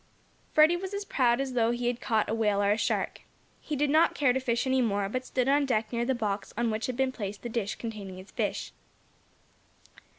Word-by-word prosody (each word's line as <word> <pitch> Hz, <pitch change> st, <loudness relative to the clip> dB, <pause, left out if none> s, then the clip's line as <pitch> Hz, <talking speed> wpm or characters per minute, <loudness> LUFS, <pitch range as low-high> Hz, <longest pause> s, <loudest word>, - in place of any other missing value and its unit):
Freddie 310 Hz, +3 st, +6 dB
was 380 Hz, +2 st, -5 dB
as 400 Hz, 0 st, -4 dB
proud 245 Hz, -6 st, +2 dB
as 270 Hz, -1 st, -2 dB
though 230 Hz, -2 st, +2 dB
he 240 Hz, +1 st, -2 dB
had 240 Hz, 0 st, -1 dB
caught 220 Hz, -2 st, +1 dB
a -, -, -1 dB
whale 210 Hz, -3 st, +1 dB
or 200 Hz, -, +3 dB
a -, -, +4 dB
shark. -, -, -1 dB, 0.4 s
He 300 Hz, -, -4 dB
did 285 Hz, 0 st, +1 dB
not 315 Hz, +2 st, +4 dB
care 270 Hz, -4 st, +3 dB
to 265 Hz, -, 0 dB
fish 240 Hz, -2 st, 0 dB
any 260 Hz, 0 st, +2 dB
more, 205 Hz, -4 st, 0 dB
but 255 Hz, +5 st, -4 dB
stood 255 Hz, -1 st, 0 dB
on 280 Hz, +1 st, +3 dB
deck 220 Hz, -2 st, 0 dB
near 235 Hz, 0 st, 0 dB
the 265 Hz, +1 st, +1 dB
box 205 Hz, -4 st, -2 dB
on 235 Hz, -1 st, +1 dB
which 215 Hz, +1 st, -2 dB
had 250 Hz, -1 st, -4 dB
been 265 Hz, -1 st, +1 dB
placed 205 Hz, -4 st, -6 dB
the 240 Hz, -, -4 dB
dish 225 Hz, -3 st, -2 dB
containing 205 Hz, -5 st, -7 dB
his 185 Hz, +2 st, -12 dB
fish. -, -, -2 dB
240 Hz, 230 wpm, -28 LUFS, 215-265 Hz, 0.4 s, Freddie